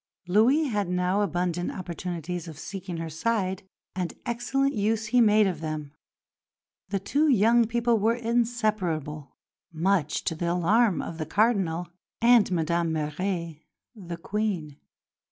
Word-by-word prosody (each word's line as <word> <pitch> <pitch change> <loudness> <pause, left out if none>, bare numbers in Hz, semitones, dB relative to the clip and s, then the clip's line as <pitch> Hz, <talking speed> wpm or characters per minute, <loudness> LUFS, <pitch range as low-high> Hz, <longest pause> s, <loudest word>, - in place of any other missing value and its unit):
Louis 230 - +4
had 210 - -1
now 180 +2 +1
abundant 175 -2 -1
opportunities 175 -1 -5
of 160 -3 -9
seeking 190 0 -6
her 165 0 -4
side; 190 +1 -1 0.3
and 180 -2 -3
excellent 270 +4 0
use 215 +1 0
he 245 +3 +3
made 215 -1 +5
of 180 -5 -2
them. 155 -2 -4 1.0
The 200 - 0
two 285 +11 +1
young 235 -2 +4
people 235 0 +1
were 225 +3 +2
inseparable, 215 - -1 0.4
much 165 -2 0
to - - -1
the 170 +1 -2
alarm 195 +4 +2
of 165 - -7
the 155 - -3
Cardinal 185 -4 +1 0.3
and 235 -1 +5
Madame 170 -1 0
Mère, 160 +1 -3 0.3
the 175 -6 -7
Queen. 180 -6 -3
190 Hz, 135 wpm, -26 LUFS, 170-225 Hz, 1.0 s, made